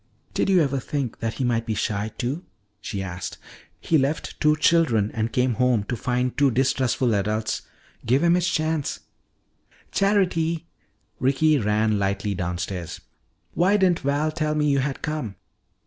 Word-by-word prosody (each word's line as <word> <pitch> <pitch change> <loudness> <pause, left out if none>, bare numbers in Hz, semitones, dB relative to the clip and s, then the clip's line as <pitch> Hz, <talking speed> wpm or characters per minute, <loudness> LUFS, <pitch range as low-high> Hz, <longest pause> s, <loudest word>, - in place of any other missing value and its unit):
"Did - - 0
you 185 -4 +5
ever 140 -1 0
think 130 -2 -3
that 115 0 -2
he 135 - -2
might 115 -2 0
be 110 - -1
shy, 105 +1 -1
too?" 135 +8 -2 0.4
she 100 -1 -4
asked. 90 -1 -6 0.4
"He 160 - +2
left 140 +4 -2
two 150 0 +4
children 150 -10 +3
and 115 0 -1
came 125 0 +1
home 125 -3 +2
to 120 - -3
find 125 +2 -1
two 140 -1 +4
distrustful 130 -1 +1
adults. 105 +2 -1 0.4
Give 130 +7 +2
him 170 0 +5
his 180 0 +2
chance 155 -2 -1 0.4
" - - -34
"Charity!" 170 -5 +2 0.5
Ricky 140 +3 +3
ran 105 -1 +1
lightly 100 +1 -1
downstairs. 90 -1 -4 0.5
"Why 190 +4 +3
didn't 185 -4 +3
Val 145 +2 0
tell 155 -1 -1
me 150 -1 +2
you 140 - +2
had 135 0 -3
come?" 150 -10 -3
130 Hz, 160 wpm, -24 LUFS, 110-155 Hz, 0.5 s, you